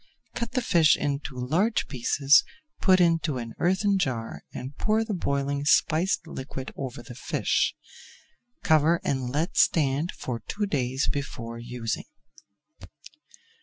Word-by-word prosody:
Cut 235 +1 -4
the 255 - 0
fish 170 -9 +4
into 140 -2 -3
large 165 - +1
pieces, 135 +2 +4 0.4
put 185 -1 +5
into 165 -5 +2
an 115 -2 -6
earthen 190 +2 +2
jar 125 -9 -2
and 130 +3 -7
pour 215 +5 +1
the 220 - -3
boiling 140 -4 -1
spiced 160 +5 +2
liquid 130 -3 -7
over 125 -3 -6
the 120 - -10
fish. 125 - 0 0.9
Cover 160 +2 +4
and 130 -3 -1
let 155 +8 -2
stand 150 +2 +2
for 120 -2 -5
two 210 0 -1
days 135 -6 -1
before 115 -5 -4
using. 120 -1 -4
145 Hz, 130 wpm, -26 LUFS, 130-175 Hz, 0.9 s, put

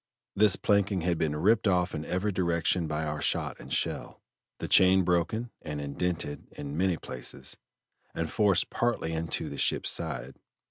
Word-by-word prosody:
This 105 -1 +5
planking 100 -2 +2
had 85 -1 0
been 75 -2 0
ripped 105 +8 +3
off 90 -2 +2
in 75 +1 -4
every 95 +4 -1
direction 85 -1 +1
by 75 0 -2
our 75 -1 -3
shot - - -1
and - - -11
shell, - - -2 0.4
the - - -4
chain 95 0 +6
broken 90 +7 0
and 75 -2 -5
indented 75 +1 -2
in 70 0 -6
many 90 0 +1
places, 65 -4 -8 0.6
and 80 - -1
forced 105 -7 +3
partly 115 -9 0
into 80 0 -2
the - - -6
ship's - - +1
side. - - -4
90 Hz, 165 wpm, -29 LUFS, 80-95 Hz, 0.6 s, chain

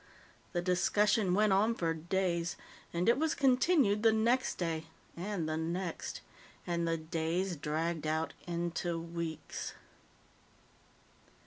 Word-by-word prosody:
The 175 -1 0
discussion 190 +2 +3
went 210 -1 +4
on 215 +4 +3
for 165 -4 0
days. 170 +1 -1 0.4
And 170 +1 -1
it 235 +3 +5
was 320 0 +1
continued 260 - +4
the 225 0 +6
next 235 +4 +2
day 165 -2 -2 0.3
and 180 -2 -3
the 155 0 -1
next. 170 +2 -3 0.4
And 170 -1 0
the 165 0 +1
days 165 +3 -1
dragged 155 +2 -2
out 160 +1 0
into 170 0 -2
weeks. 165 -1 -5
175 Hz, 120 wpm, -33 LUFS, 165-205 Hz, 0.4 s, the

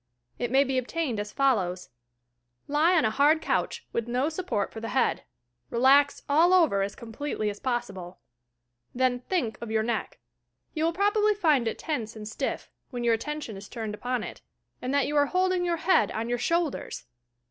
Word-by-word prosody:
It 240 - -1
may 270 +3 +5
be 265 -1 0
obtained 255 -2 -2
as 205 0 -4
follows: 195 -10 0 0.8
Lie 315 +5 +3
on 315 - +3
a 215 - +2
hard 290 +6 +4
couch, - - -1
with 235 0 -1
no 250 +5 0
support 310 - -2
for 225 - -6
the 225 - -5
head. 260 - +1 0.4
Relax 275 +4 +4
all 330 +6 +5
over 315 - +4
as 195 +1 -2
completely 225 -2 -3
as 205 - -10
possible. 200 -8 -3 0.8
Then 250 0 +2
think 245 - -2
of 235 - -5
your 220 0 +1
neck. 235 +1 -2 0.6
You 315 0 0
will 330 - +2
probably 415 +3 +2
find 305 - +2
it 225 - -2
tense 230 -8 -4
and 210 -1 -7
stiff, 220 - -4 0.2
when 245 -3 -5
your 235 -1 +3
attention 260 0 -4
is 200 +1 -10
turned 220 -3 -5
upon 245 +2 -2
it, - - -8 0.4
and 250 - -3
that 280 -1 +2
you 295 - -3
are 285 0 +4
hold 370 +2 +1
ing 360 -1 0
your 340 -1 0
head 375 +3 +3
on 225 +2 -3
your 245 0 0
shoulders! 335 -4 -1
255 Hz, 190 wpm, -27 LUFS, 225-315 Hz, 0.8 s, may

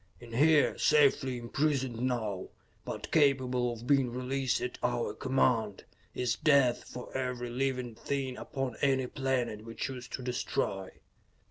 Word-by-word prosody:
In 120 -1 -12
here, 150 +4 +4
safely 140 -3 +4
imprisoned 130 0 -1
now, 110 -7 -1 0.4
but - - -6
capable 130 -5 +3
of 120 0 -8
being 135 -1 +3
released 130 +1 -1
at 125 - -4
our 120 -1 0
command, 120 -6 +1 0.3
is 125 -3 0
death 140 -6 +3
for 125 - -9
every 125 -2 -2
living 130 -1 -1
thing 130 +3 -3
upon 135 -4 -4
any 135 -2 +2
planet 125 -5 -1
we 115 0 -9
choose 125 +1 -4
to 130 - -6
destroy." 120 -6 -2
125 Hz, 135 wpm, -31 LUFS, 120-135 Hz, 0.4 s, here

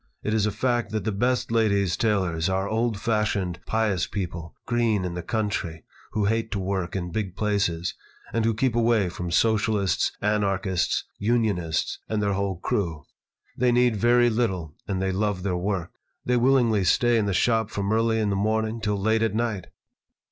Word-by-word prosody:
It 105 - -1
is 105 -1 +2
a - - 0
fact 120 -1 0
that 110 -3 -1
the 110 - -1
best 120 +4 0
ladies' 100 -6 +2
tailors 95 -6 0
are 95 +1 0
old 110 0 0
fashioned, 105 -5 0
pious 105 -5 +1
people, 85 -4 -5
green 115 -5 +1
in 90 - -3
the 90 - -4
country, 100 -7 -2 0.3
who 105 -1 +1
hate 115 +2 0
to 100 - -1
work 95 -2 -2
in 90 -2 -3
big 95 -2 -3
places, 100 -6 0 0.4
and 115 - +1
who 115 -1 +1
keep 125 +1 +1
away 115 -5 +3
from 85 0 -5
Socialists, 105 0 +2
anarchists, 95 -4 0 0.2
unionists, 100 -8 0
and 110 - 0
their 100 -1 +1
whole 100 -1 -1
crew. 85 -4 -2 0.5
They 125 0 +2
need 120 -1 +3
very 120 +2 +4
little, 95 -9 -1
and 95 -2 -1
they 95 0 0
love 100 -1 -1
their 95 -2 0
work. 90 -1 -2 0.3
They 125 - +2
willingly 120 -4 +3
stay 120 +6 +3
in 105 - 0
the - - +1
shop 110 -1 +2
from 100 0 -1
early 115 0 +2
in 105 -2 +1
the - - 0
morning 110 +2 0
till 105 -2 -1
late 110 +3 +2
at 110 -2 0
night." 110 -5 -1
105 Hz, 180 wpm, -25 LUFS, 95-115 Hz, 0.5 s, very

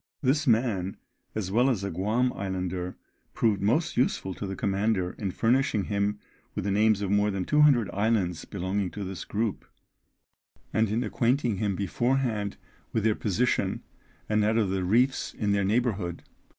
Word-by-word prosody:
This 145 +3 +2
man, 110 -6 +1 0.4
as 100 -4 -2
well 120 +6 +4
as 110 -7 0
a 100 - -2
Guam 110 +8 +1
islander, 90 -2 -3 0.4
proved 110 -3 +2
most 150 +11 +1
useful 95 -6 +1
to 100 - -5
the 95 - -4
commander 100 -3 0
in 100 - -1
furnishing 120 +1 +1
him 100 +1 -1 0.4
with - - -2
the 100 - 0
names 105 0 +3
of 100 - -1
more 105 +1 +3
than 95 -2 -2
200 150 -7 +4
islands 100 -5 0
belonging 95 0 -2
to 100 +3 -6
this 95 -1 -5
group, 110 -1 -2 1.1
and 110 -1 +2
in 115 +4 0
acquainting 120 0 +1
him 100 -2 0
beforehand 110 +1 0 0.3
with 110 - 0
their 110 -1 +3
position, 110 +4 0 0.4
and 105 0 +2
that 110 +2 +2
of 105 -4 +2
the 95 -1 -1
reefs 125 +8 +1
in 105 -2 0
their 100 0 +2
neighbourhood. 100 -5 0
105 Hz, 165 wpm, -27 LUFS, 95-115 Hz, 1.1 s, well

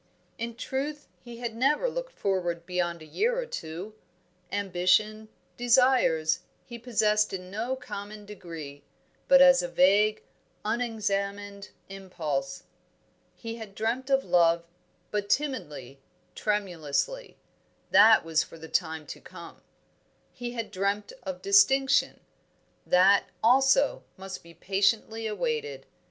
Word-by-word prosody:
In 230 0 -4
truth, 285 +5 -4
he 240 -1 -11
had 235 -1 -4
never 275 - +2
looked - - -5
forward 175 -4 -2
beyond 175 -2 -2
a - - -11
year 455 - 0
or - - -2
two. 180 - -7 0.6
Ambition, 200 +3 +1 0.3
desires, 245 -10 +3 0.3
he 235 -1 -9
possessed 215 -3 +1
in 185 -1 -6
no 230 +6 -2
common 210 -4 -8
degree, 165 -8 -9 0.5
but 275 0 +8
as 270 -1 +6
a 175 - -3
vague, 200 +5 +3 0.4
unexamined 205 -3 -2 0.2
impulse. 160 -8 -4 0.7
He 230 0 -7
had 215 -4 -10
dreamt 240 +5 -2
of 270 0 +2
love, 170 -1 +3 0.5
but 205 -1 -2
timidly, 150 - -2 0.3
tremulously; 205 - -2 0.5
that 220 -5 +7
was 160 -1 +2
for - - -9
the 160 0 -10
time 160 -2 -2
to - - -9
come. - - -12 0.7
He 245 -1 -6
had 230 -2 -5
dreamt 200 +1 -2
of 185 -1 -7
distinction; 230 +8 +4 0.7
that, 190 +2 +5 0.2
also, 270 +4 +4
must 190 0 -8
be 170 0 -16
patiently 215 +5 0
awaited. 455 - -3
205 Hz, 120 wpm, -27 LUFS, 180-245 Hz, 0.7 s, but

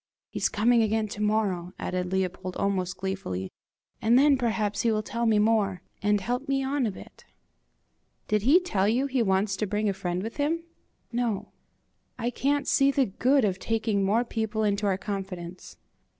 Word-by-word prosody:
"He's - - 0
coming 230 +3 +3
again 220 0 +1
to 205 - -6
morrow," 200 -4 0
added 180 0 -3
Leopold, 185 -1 -2
almost 185 -2 -1
gleefully, 185 - -4 0.5
"and 230 +2 +4
then 285 +1 +6
perhaps 220 -5 0
he 230 - +2
will 215 0 0
tell 235 +2 -2
me 220 -1 +4
more, 210 -3 +2 0.2
and 205 0 +2
help 245 +8 -3
me 270 0 +1
on 270 -2 0
a - - -2
bit!" - - -13 1.0
"Did 210 -1 +1
he 280 - +6
tell 205 - 0
you 250 +5 +2
he 265 -2 0
wants 195 -1 +1
to 215 - -1
bring 210 +2 0
a 200 - +1
friend 180 -1 -3
with 225 +5 -6
him?" 315 +3 0 0.5
"No." 225 -4 -1 0.7
"I 240 +1 -1
can't 280 +3 0
see 275 0 +4
the 275 -1 +2
good 255 +5 +2
of 190 -2 -1
taking 220 -2 0
more 215 +5 +2
people 220 -1 -2
into 205 0 +1
our 190 -2 +1
confidence." 190 -3 -6
215 Hz, 180 wpm, -27 LUFS, 195-240 Hz, 1.0 s, then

